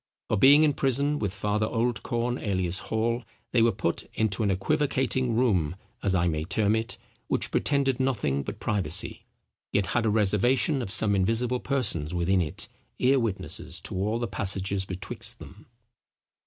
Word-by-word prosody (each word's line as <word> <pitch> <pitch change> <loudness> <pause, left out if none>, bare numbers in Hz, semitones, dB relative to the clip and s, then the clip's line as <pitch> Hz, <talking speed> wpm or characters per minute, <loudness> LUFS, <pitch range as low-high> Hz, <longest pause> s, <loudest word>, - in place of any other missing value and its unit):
For - - +2
being 145 +8 +7
in 150 -2 +3
prison 140 +2 +1
with 100 -4 -1
Father 105 +2 -1
Oldcorn 120 +1 -1
alias 95 -3 -1
Hall, 115 +2 0 0.3
they 120 - +3
were 115 0 +5
put 100 - -2
into 110 -1 0
an 105 - +2
equivocating 130 +3 +1
room 95 -10 +2 0.3
(as 95 -2 +1
I 90 -1 +2
may 80 -2 -1
term 105 +5 +1
it) 110 0 -3 0.3
which - - 0
pretended 140 -3 +1
nothing 105 - 0
but - - -6
privacy, 100 -3 0 0.5
yet 100 - +2
had 120 -2 +1
a - - +3
reservation 110 +6 +2
of 115 - -4
some 105 +1 +1
invisible 115 +6 +1
persons 100 - -1
within 90 +2 +2
it, 75 -4 -4 0.3
ear 135 +2 +3
witnesses 115 -5 -3
to - - -6
all 105 +5 0
the 120 0 -2
passages 95 -1 -2
betwixt 95 0 -4
them." - - -13
110 Hz, 160 wpm, -27 LUFS, 95-125 Hz, 0.5 s, being